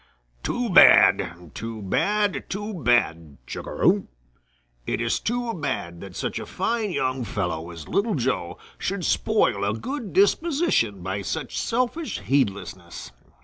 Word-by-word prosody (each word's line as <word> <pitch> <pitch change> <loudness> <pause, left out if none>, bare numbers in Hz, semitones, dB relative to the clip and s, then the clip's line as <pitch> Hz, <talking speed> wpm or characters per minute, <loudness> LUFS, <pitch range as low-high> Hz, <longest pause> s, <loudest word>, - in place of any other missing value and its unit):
"Too 245 - -2
bad. 90 - +6
Too 115 0 -6
bad! 205 - 0
Too 205 +2 -4
bad! 115 - +1
Chug - - -7
a - - -6
rum! - - +2 0.8
It - - -1
is 115 -1 0
too 240 0 -2
bad 130 - -4
that 95 -2 -10
such - - -3
a - - -7
fine 225 -2 -1
young 130 -6 -1
fellow 90 -7 -3
as 85 -3 -9
Little 210 0 0
Joe 115 - -1 0.2
should 195 -2 -2
spoil 215 - +2
a 100 +2 0
good 245 - -5
disposition 200 - +2
by 95 +2 -3
such 135 +7 -4
selfish 255 - -1
heedlessness. 95 - -2
130 Hz, 140 wpm, -24 LUFS, -, 0.8 s, bad